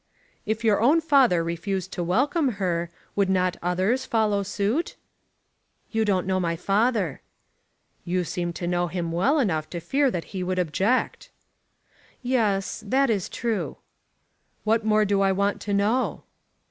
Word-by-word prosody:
"If 220 Hz, +1 st, -1 dB
your 215 Hz, -2 st, +3 dB
own 285 Hz, +8 st, +5 dB
father 270 Hz, -, +4 dB
refused 180 Hz, +3 st, -3 dB
to 175 Hz, -, -2 dB
welcome 260 Hz, -, +1 dB
her, 175 Hz, -4 st, -1 dB, 0.3 s
would 200 Hz, -2 st, +2 dB
not 185 Hz, -1 st, +1 dB
others 185 Hz, +9 st, 0 dB
follow 220 Hz, -5 st, +1 dB
suit?" 205 Hz, -, -1 dB, 1.0 s
"You 220 Hz, -1 st, +1 dB
don't 190 Hz, -3 st, +1 dB
know 190 Hz, 0 st, 0 dB
my 170 Hz, -2 st, 0 dB
father." 200 Hz, -, 0 dB, 0.8 s
"You 180 Hz, +1 st, -1 dB
seem 175 Hz, 0 st, -3 dB
to 175 Hz, -, -5 dB
know 175 Hz, 0 st, 0 dB
him 170 Hz, -1 st, -3 dB
well 195 Hz, -, +2 dB
enough 160 Hz, -, 0 dB
to 175 Hz, -, -5 dB
fear 275 Hz, -, +1 dB
that 175 Hz, -8 st, -3 dB
he 190 Hz, -, -3 dB
would 185 Hz, 0 st, -2 dB
object." 190 Hz, +8 st, 0 dB, 0.9 s
"Yes; 220 Hz, -5 st, 0 dB
that 265 Hz, +3 st, +3 dB
is 200 Hz, -5 st, -1 dB
true." 230 Hz, -3 st, -3 dB, 0.9 s
"What 220 Hz, +1 st, +2 dB
more 215 Hz, 0 st, +3 dB
do 200 Hz, -1 st, +1 dB
I 195 Hz, 0 st, +3 dB
want 200 Hz, +1 st, 0 dB
to 205 Hz, -, -3 dB
know?" 215 Hz, +6 st, 0 dB
200 Hz, 150 wpm, -25 LUFS, 180-230 Hz, 1.0 s, own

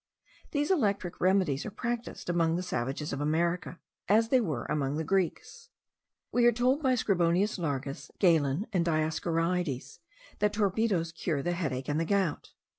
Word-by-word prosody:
These 295 Hz, +3 st, 0 dB
electric 200 Hz, -, 0 dB
remedies 185 Hz, -7 st, +2 dB
are -, -, -4 dB
practised 235 Hz, +3 st, -4 dB
among 170 Hz, -2 st, +2 dB
the 180 Hz, -, -2 dB
savages 135 Hz, -1 st, -3 dB
of 140 Hz, -, -3 dB
America, 170 Hz, +4 st, 0 dB, 0.3 s
as 225 Hz, +2 st, +4 dB
they 260 Hz, 0 st, +4 dB
were 150 Hz, -, -2 dB
among 140 Hz, -1 st, -1 dB
the 160 Hz, -, -1 dB
Greeks. 195 Hz, -, -2 dB, 0.6 s
We 240 Hz, -1 st, +4 dB
are -, -, +7 dB
told 250 Hz, +5 st, +1 dB
by 260 Hz, -3 st, +3 dB
Scribonius 190 Hz, -2 st, +1 dB
Largus, 135 Hz, -4 st, -3 dB
Galen, 165 Hz, -1 st, +3 dB
and 180 Hz, -3 st, +2 dB
Dioscorides, 165 Hz, -1 st, -1 dB, 0.4 s
that 210 Hz, 0 st, +2 dB
torpedos 200 Hz, -4 st, +1 dB
cure 160 Hz, -4 st, -2 dB
the 175 Hz, -, 0 dB
headache 135 Hz, -7 st, -2 dB
and 150 Hz, +1 st, 0 dB
the 165 Hz, -, 0 dB
gout. 195 Hz, -4 st, -1 dB
175 Hz, 155 wpm, -29 LUFS, 155-210 Hz, 0.6 s, are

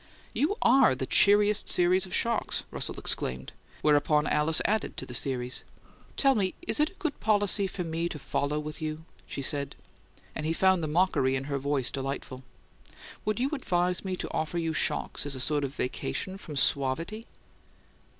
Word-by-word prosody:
"You 345 Hz, +9 st, +1 dB
ARE 270 Hz, -, +5 dB
the 130 Hz, -, -3 dB
cheeriest 205 Hz, +7 st, +4 dB
series 180 Hz, +2 st, +3 dB
of 185 Hz, -, -3 dB
shocks," 230 Hz, -1 st, 0 dB
Russell -, -, -4 dB
exclaimed, 65 Hz, +1 st, -3 dB, 0.3 s
whereupon 150 Hz, 0 st, +3 dB
Alice 150 Hz, +2 st, +4 dB
added 215 Hz, +1 st, 0 dB
to -, -, -4 dB
the 125 Hz, -, -9 dB
series. 125 Hz, 0 st, +1 dB, 0.5 s
"Tell 275 Hz, -1 st, +4 dB
me: 195 Hz, -6 st, 0 dB
Is 345 Hz, -, +1 dB
it 300 Hz, +1 st, +3 dB
a -, -, -20 dB
good 320 Hz, -7 st, -3 dB
policy 205 Hz, -2 st, +2 dB
for 185 Hz, -1 st, -4 dB
me 165 Hz, +1 st, -2 dB
to 155 Hz, -, -5 dB
follow 145 Hz, +1 st, -2 dB
with 150 Hz, +1 st, -7 dB
you?" 155 Hz, +1 st, -4 dB, 0.2 s
she -, -, -5 dB
asked, 140 Hz, 0 st, -1 dB, 0.6 s
and 155 Hz, -, -5 dB
he 165 Hz, -, +1 dB
found 190 Hz, +1 st, +3 dB
the 155 Hz, -, -2 dB
mockery 150 Hz, -5 st, +2 dB
in 130 Hz, -, -2 dB
her 140 Hz, 0 st, -3 dB
voice 140 Hz, -2 st, -1 dB
delightful. 135 Hz, -1 st, -5 dB, 0.8 s
"Would 215 Hz, 0 st, 0 dB
you 265 Hz, +4 st, 0 dB
advise 180 Hz, -9 st, 0 dB
me 190 Hz, -1 st, -2 dB
to -, -, -6 dB
offer 160 Hz, +2 st, -2 dB
you 165 Hz, -1 st, -1 dB
shocks 145 Hz, -, -1 dB
as 140 Hz, -, -2 dB
a -, -, -6 dB
sort 145 Hz, +2 st, 0 dB
of 140 Hz, +1 st, -4 dB
vacation 135 Hz, +9 st, -3 dB
from 155 Hz, -6 st, -8 dB
suavity?" 145 Hz, -, +1 dB
160 Hz, 180 wpm, -28 LUFS, 140-200 Hz, 0.8 s, ARE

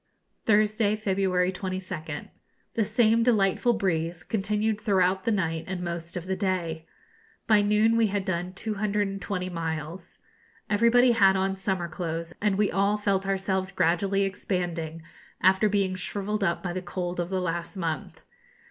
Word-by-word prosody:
Thursday, 215 Hz, 0 st, +3 dB
February 190 Hz, -3 st, +1 dB
22nd. 185 Hz, -5 st, -5 dB, 0.4 s
The 225 Hz, -, +1 dB
same 225 Hz, +1 st, +3 dB
delightful 230 Hz, 0 st, +3 dB
breeze 175 Hz, -5 st, -1 dB
continued 210 Hz, 0 st, -1 dB
throughout 190 Hz, -3 st, +2 dB
the 230 Hz, -, +2 dB
night 165 Hz, -6 st, -1 dB
and 185 Hz, -1 st, -4 dB
most 170 Hz, 0 st, -5 dB
of 175 Hz, -, -5 dB
the 190 Hz, 0 st, -1 dB
day. 170 Hz, -5 st, -2 dB, 0.6 s
By 215 Hz, -2 st, +5 dB
noon 210 Hz, +2 st, +3 dB
we 230 Hz, -1 st, +4 dB
had 200 Hz, -1 st, -2 dB
done 180 Hz, -1 st, -2 dB
220 200 Hz, -2 st, -2 dB
miles. 165 Hz, +1 st, -5 dB, 0.5 s
Everybody 235 Hz, +4 st, +5 dB
had 195 Hz, -4 st, +5 dB
on 190 Hz, 0 st, 0 dB
summer 190 Hz, -2 st, -2 dB
clothes, 165 Hz, 0 st, -4 dB
and 205 Hz, -2 st, +2 dB
we 205 Hz, -1 st, +2 dB
all 200 Hz, +2 st, +2 dB
felt 195 Hz, -2 st, 0 dB
ourselves 190 Hz, -1 st, 0 dB
gradually 195 Hz, +3 st, +1 dB
expanding 175 Hz, -4 st, -3 dB, 0.4 s
after 190 Hz, +3 st, +4 dB
being 195 Hz, -2 st, +1 dB
shrivelled 200 Hz, +3 st, -2 dB
up 170 Hz, -3 st, 0 dB
by 175 Hz, -2 st, -2 dB
the 185 Hz, -, -3 dB
cold 175 Hz, 0 st, -4 dB
of 175 Hz, 0 st, -2 dB
the 190 Hz, -1 st, -1 dB
last 175 Hz, +1 st, -3 dB
month. 165 Hz, -4 st, -4 dB
190 Hz, 150 wpm, -27 LUFS, 175-210 Hz, 0.6 s, By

